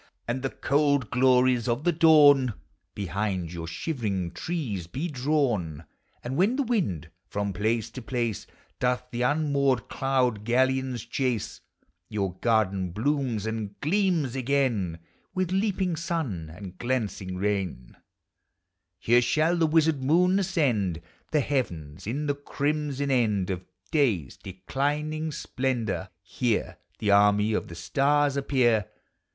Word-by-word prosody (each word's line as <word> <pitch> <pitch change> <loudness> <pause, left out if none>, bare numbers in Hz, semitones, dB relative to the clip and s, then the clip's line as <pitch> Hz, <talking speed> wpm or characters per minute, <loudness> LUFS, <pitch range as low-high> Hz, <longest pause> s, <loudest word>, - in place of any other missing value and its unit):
And 120 +2 -1
the 135 - -1
cold 140 -4 +1
glories 125 -1 +3
of 120 +4 0
the 175 - +3
dawn 145 - +6 0.4
Behind 95 -2 -2
your 85 -1 -5
shivering 100 - -2
trees 105 - -4
be 135 - -3
drawn; 125 - -1 0.4
And 125 +2 -4
when 200 +8 +3
the 280 - +1
wind 100 - -1 0.2
from 100 -1 -2
place 110 +3 -1
to 130 - -7
place 120 -2 -2 0.3
l>oth 125 0 +1
the 120 - -3
unmoored 140 -2 +1
cloud 130 -5 0
galleons 130 +1 +1
chase, 120 -2 -2 0.5
Your 100 -4 -2
garden 100 -5 +1
blooms 120 - -1
and 110 -2 -4
gleams 165 - +1
again 125 -10 0 0.4
With 185 -1 0
leaping 190 -2 0
sun 150 - -3
and 90 +2 -10
glancing 110 -7 -2
rain; 95 -10 -2 1.0
Here 120 +6 +4
shall 155 +7 +2
the 165 -2 +2
wizard 155 -3 +2
moon 180 +7 +4
ascend 125 - 0 0.3
The 150 - +3
heavens, 90 - -3
in 140 +7 -2
the 145 - +1
crimson 145 0 -2
end 105 -7 +1
Of 90 -1 -4 0.3
day's 110 - +1
declining 150 - -3
splendor; 120 -9 -2
here, 115 +3 -1 0.2
The 105 -2 +1
army 105 +1 +4
of - - -1
the 85 - -9
stars 140 - +2
appear. 125 -7 +2
125 Hz, 125 wpm, -27 LUFS, 100-145 Hz, 1.0 s, dawn